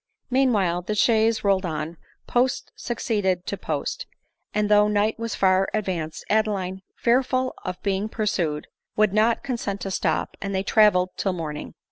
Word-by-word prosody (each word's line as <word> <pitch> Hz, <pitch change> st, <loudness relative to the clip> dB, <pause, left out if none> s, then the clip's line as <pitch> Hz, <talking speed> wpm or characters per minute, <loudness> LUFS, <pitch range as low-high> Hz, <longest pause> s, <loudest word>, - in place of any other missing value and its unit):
Meanwhile 210 Hz, -10 st, +2 dB
the 210 Hz, +4 st, -3 dB
chaise 225 Hz, 0 st, +3 dB
rolled 195 Hz, -1 st, +3 dB
on 160 Hz, -1 st, -4 dB
— -, -, -38 dB
post 250 Hz, +1 st, +1 dB
succeeded 205 Hz, -6 st, -1 dB
to -, -, -2 dB
post; -, -, -3 dB, 0.4 s
and 210 Hz, 0 st, +1 dB
though 210 Hz, 0 st, +5 dB
night 210 Hz, +2 st, +1 dB
was 230 Hz, -1 st, -3 dB
far 190 Hz, 0 st, +3 dB
advanced, 175 Hz, -7 st, -3 dB
Adeline, 200 Hz, -3 st, 0 dB
fear 240 Hz, +2 st, +3 dB
ful 255 Hz, 0 st, -1 dB
of 180 Hz, -1 st, -4 dB
being 200 Hz, +1 st, 0 dB
pursued, 175 Hz, -9 st, -1 dB, 0.3 s
would 210 Hz, -2 st, +3 dB
not 220 Hz, +2 st, +3 dB
consent 230 Hz, -6 st, -3 dB
to 195 Hz, -, -3 dB
stop, -, -, -1 dB
and 200 Hz, 0 st, -3 dB
they 190 Hz, -, 0 dB
travelled 200 Hz, -4 st, +4 dB
till 195 Hz, -, 0 dB
morning. 155 Hz, -4 st, -5 dB
205 Hz, 160 wpm, -24 LUFS, 185-220 Hz, 0.4 s, though